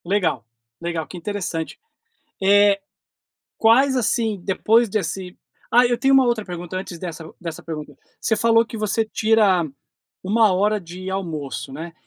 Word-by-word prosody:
Legal, 170 Hz, -, 0 dB, 0.4 s
legal, 170 Hz, -2 st, -3 dB
que -, -, -10 dB
interessante! 175 Hz, -3 st, -4 dB, 0.6 s
É, 200 Hz, +1 st, +5 dB, 0.8 s
quais 260 Hz, +4 st, +4 dB
assim, 225 Hz, -4 st, 0 dB
depois 225 Hz, +4 st, +3 dB
desse 190 Hz, -3 st, -3 dB, 0.3 s
Ah, 245 Hz, +1 st, +6 dB
eu 240 Hz, 0 st, +1 dB
tenho 270 Hz, 0 st, +3 dB
uma 265 Hz, -1 st, +6 dB
outra 235 Hz, -3 st, 0 dB
pergunta 175 Hz, -1 st, -6 dB
antes 185 Hz, -2 st, -6 dB
dessa 165 Hz, -2 st, -7 dB
dessa 165 Hz, -2 st, -6 dB
pergunta. 150 Hz, -3 st, -7 dB, 0.2 s
Você 220 Hz, -, +1 dB
falou 230 Hz, +1 st, +4 dB
que 230 Hz, -, -8 dB
você 215 Hz, +1 st, 0 dB
tira 215 Hz, -5 st, +3 dB, 0.6 s
1 215 Hz, +1 st, +4 dB
hora 205 Hz, +3 st, +1 dB
de 180 Hz, +1 st, -8 dB
almoço, 155 Hz, -8 st, -4 dB
né? 165 Hz, +4 st, -7 dB
195 Hz, 145 wpm, -22 LUFS, 170-225 Hz, 0.8 s, Ah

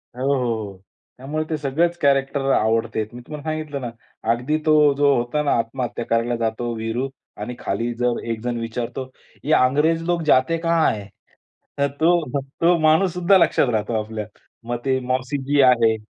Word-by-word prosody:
हो, 130 Hz, -, -5 dB
हो, 130 Hz, -, 0 dB, 0.3 s
हो. 95 Hz, -, -15 dB, 0.4 s
त्यामुळे 150 Hz, +5 st, -3 dB
ते 155 Hz, -, -1 dB
सगळेच 160 Hz, +5 st, 0 dB
कॅरेक्टर 140 Hz, -2 st, +1 dB
आवडते 110 Hz, 0 st, +1 dB
आहेत. 110 Hz, +1 st, -4 dB
मी 125 Hz, -, -9 dB
तुम्हाला 150 Hz, -1 st, -7 dB
सांगितलं 155 Hz, -3 st, -4 dB
ना, 120 Hz, -, -4 dB, 0.4 s
अगदी 125 Hz, +7 st, 0 dB
तो 150 Hz, -2 st, +5 dB
जो 145 Hz, -1 st, +4 dB
होता 120 Hz, +5 st, 0 dB
ना, 145 Hz, -, +1 dB
आत्महत्या 120 Hz, +1 st, -3 dB
करायला 115 Hz, +1 st, 0 dB
जातो 115 Hz, +1 st, -2 dB
वीरू 115 Hz, +4 st, -2 dB, 0.3 s
आणि 125 Hz, -, -5 dB
खाली 115 Hz, +4 st, -2 dB
जर 125 Hz, -1 st, +1 dB
एक 115 Hz, -1 st, -2 dB
जण 120 Hz, -1 st, -2 dB
विचारतो, 120 Hz, +3 st, -4 dB, 0.3 s
"ये 155 Hz, -, +1 dB
अंग्रेज 150 Hz, +5 st, +3 dB
लोक 175 Hz, -1 st, +1 dB
जाते 155 Hz, +4 st, +3 dB
कहां 165 Hz, -3 st, +2 dB
है?" 100 Hz, -2 st, -8 dB, 0.7 s
तर 140 Hz, -, +3 dB
तो 160 Hz, -4 st, +2 dB, 0.2 s
तो 170 Hz, +1 st, +5 dB
माणूससुद्धा 180 Hz, +4 st, +4 dB
लक्षात 165 Hz, -6 st, +3 dB
राहतो 110 Hz, +1 st, -1 dB
आपल्या. 110 Hz, -1 st, -5 dB, 0.4 s
मग 120 Hz, 0 st, -2 dB
ते 130 Hz, -1 st, +2 dB
मौसीजी 130 Hz, +3 st, 0 dB
आहे, 120 Hz, -4 st, +5 dB
130 Hz, 170 wpm, -22 LUFS, 120-155 Hz, 0.7 s, तो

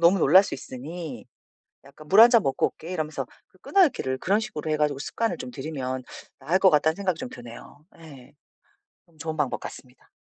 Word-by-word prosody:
너무 170 Hz, +3 st, +5 dB
놀랄 185 Hz, +4 st, +7 dB
수 -, -, -5 dB
있으니 150 Hz, +6 st, -8 dB, 0.6 s
약간 140 Hz, +2 st, -16 dB
"물 195 Hz, +5 st, +5 dB
1 235 Hz, -, +9 dB
잔 235 Hz, -3 st, +6 dB
먹고 135 Hz, -, +1 dB
올게." 165 Hz, -, -10 dB
이러면서 155 Hz, -3 st, -3 dB, 0.2 s
그 -, -, -28 dB
끊어 390 Hz, -2 st, +4 dB
읽기를 130 Hz, -, -2 dB
그런 195 Hz, +9 st, +1 dB
식으로 160 Hz, -9 st, -5 dB
해 -, -, +2 dB
가지고 150 Hz, -2 st, 0 dB
습관을 185 Hz, +5 st, -2 dB
좀 130 Hz, -3 st, -7 dB
들이면 130 Hz, -2 st, -5 dB, 0.4 s
나을 155 Hz, +7 st, +1 dB
것 190 Hz, -, +6 dB
같다는 155 Hz, +1 st, +3 dB
생각이 185 Hz, -4 st, -2 dB
좀 -, -, -5 dB
드네요. 120 Hz, +4 st, -12 dB, 0.2 s
예. 140 Hz, -6 st, -14 dB, 0.7 s
좀 165 Hz, -2 st, -27 dB
좋은 160 Hz, 0 st, -4 dB
방법 145 Hz, -4 st, -1 dB
같습니다. 125 Hz, -1 st, -12 dB
155 Hz, 380 characters per minute, -25 LUFS, 135-185 Hz, 0.7 s, 1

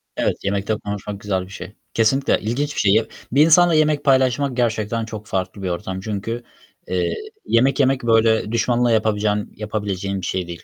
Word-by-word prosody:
Evet, -, -, 0 dB
yemekte 100 Hz, +2 st, -1 dB
konuşmak 100 Hz, 0 st, -5 dB
güzel 95 Hz, -3 st, -1 dB
bir -, -, -16 dB
şey. 100 Hz, -, -9 dB, 0.2 s
Kesinlikle 115 Hz, +5 st, +2 dB
ilginç 140 Hz, +7 st, -2 dB
bir -, -, -2 dB
şey. 100 Hz, -2 st, +4 dB
Ya, 110 Hz, +1 st, +3 dB, 0.3 s
bir 145 Hz, +5 st, +5 dB
insanla 170 Hz, +1 st, +6 dB
yemek 155 Hz, -2 st, +2 dB
paylaşmak 130 Hz, -1 st, +2 dB
gerçekten 115 Hz, -1 st, 0 dB
çok 110 Hz, -2 st, -8 dB
farklı 95 Hz, +1 st, -3 dB
bir 95 Hz, -, -1 dB
ortam. 95 Hz, +2 st, -4 dB
Çünkü, 110 Hz, +4 st, -4 dB, 0.4 s
eee, 90 Hz, -1 st, 0 dB, 0.3 s
yemek 130 Hz, +5 st, +2 dB
yemek, 135 Hz, -1 st, +2 dB
böyle, 115 Hz, -1 st, +3 dB
düşmanla 120 Hz, +1 st, +2 dB
yapabilecen 105 Hz, -1 st, +1 dB
yapabileceğin 100 Hz, -2 st, -3 dB
bir 90 Hz, -, -5 dB
şey 90 Hz, -2 st, -2 dB
değil. 85 Hz, -2 st, -8 dB
110 Hz, 175 wpm, -21 LUFS, 100-125 Hz, 0.4 s, insanla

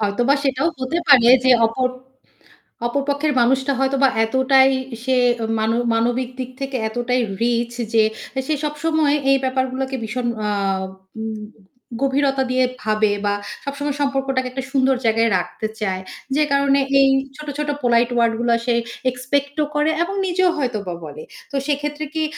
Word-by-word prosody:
হয়তোবা 240 Hz, +6 st, +2 dB
সেটাও 270 Hz, +3 st, +1 dB
হতে 260 Hz, +7 st, -1 dB
পারে 250 Hz, -5 st, +7 dB, 0.2 s
যে 260 Hz, -, +5 dB, 0.2 s
অপর 255 Hz, +3 st, 0 dB, 1.0 s
অপর 280 Hz, +4 st, -1 dB
পক্ষের 290 Hz, +1 st, 0 dB
মানুষটা 265 Hz, +3 st, +2 dB
হয়তোবা 270 Hz, 0 st, +3 dB, 0.2 s
এতটাই 265 Hz, +2 st, +4 dB, 0.3 s
সে 260 Hz, 0 st, +1 dB, 0.4 s
মান 220 Hz, +1 st, +1 dB, 0.2 s
মানবিক 240 Hz, +2 st, 0 dB
দিক 255 Hz, -1 st, -4 dB
থেকে 270 Hz, -1 st, -2 dB
এতটাই 245 Hz, +2 st, -1 dB, 0.2 s
রিচ 235 Hz, 0 st, 0 dB, 0.2 s
যে 220 Hz, -1 st, +5 dB, 0.4 s
সে 310 Hz, -, +1 dB
সবসময় 300 Hz, 0 st, +1 dB, 0.2 s
এই 275 Hz, -, +5 dB
ব্যাপারগুলাকে 260 Hz, 0 st, -1 dB
ভীষণ 240 Hz, +3 st, -3 dB, 0.2 s
আ -, -, 0 dB, 0.7 s
উম 220 Hz, 0 st, -4 dB, 0.7 s
গভীরতা 275 Hz, 0 st, +1 dB
দিয়ে 255 Hz, 0 st, +3 dB, 0.2 s
ভাবে 215 Hz, 0 st, +2 dB
বা 205 Hz, -, +2 dB, 0.3 s
সবসময় 280 Hz, 0 st, -3 dB
সম্পর্কটাকে 270 Hz, -2 st, 0 dB
একটা 265 Hz, +1 st, -4 dB
সুন্দর 265 Hz, -1 st, +3 dB
জায়গায় 225 Hz, +1 st, +3 dB
রাখতে 200 Hz, +4 st, -4 dB
চায়। 190 Hz, -3 st, -1 dB, 0.3 s
যে 305 Hz, -, +3 dB
কারণে 280 Hz, 0 st, +3 dB, 0.2 s
এই 275 Hz, -, +6 dB, 0.3 s
ছোট, 300 Hz, 0 st, -10 dB
ছোট 300 Hz, 0 st, -2 dB
polite 240 Hz, 0 st, +3 dB
ওয়ারড 230 Hz, -1 st, +3 dB
গুলা 235 Hz, 0 st, +2 dB
সে 240 Hz, -2 st, +2 dB, 0.4 s
এক্সপেক্ট 280 Hz, +3 st, -2 dB
ও -, -, -1 dB
করে 300 Hz, +1 st, +2 dB
এবং 390 Hz, +3 st, -4 dB
নিজেও 365 Hz, 0 st, +2 dB
হয়তোবা 215 Hz, -10 st, -2 dB
বলে। 465 Hz, -, -9 dB, 0.3 s
তো -, -, -6 dB
সেক্ষেত্রে 295 Hz, +1 st, -2 dB
কি 320 Hz, -1 st, 0 dB
265 Hz, 150 wpm, -20 LUFS, 240-280 Hz, 1.0 s, পারে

